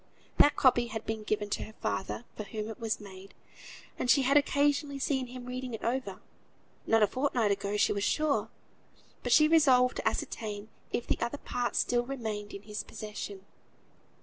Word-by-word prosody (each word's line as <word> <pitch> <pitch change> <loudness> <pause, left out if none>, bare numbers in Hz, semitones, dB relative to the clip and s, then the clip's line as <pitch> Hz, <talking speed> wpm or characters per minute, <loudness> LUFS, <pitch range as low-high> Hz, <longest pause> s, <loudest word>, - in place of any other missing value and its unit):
That 290 - +7
copy 240 -2 +4
had 220 -1 -5
been 220 -1 -3
given 210 0 -1
to - - -1
her 220 - -13
father, 190 +5 -3
for - - -5
whom 215 +1 -5
it 220 - -8
was 225 -1 -1
made, 195 -1 -12 0.6
and 245 - -1
she 270 +3 +6
had 275 +2 +3
occasionally 285 0 +2
seen 265 -2 0
him 250 0 -9
reading 250 -1 -4
it - - -10
over, 235 -5 -2 0.7
not 225 -1 +5
a - - +5
fortnight 255 -5 +1
ago 200 +1 -1
she - - +3
was 200 -1 -2
sure. 280 -6 +1 0.7
But - - -3
she 305 - +7
resolved 260 -6 +5
to - - -1
ascertain 210 -1 -3 0.2
if 240 - -1
the - - -1
other 235 +5 -1
part 245 -3 -2
still 240 0 +2
remained 220 -5 -4
in 200 - -8
his 210 0 -5
possession. 210 -2 -7
230 Hz, 180 wpm, -30 LUFS, 210-260 Hz, 0.7 s, That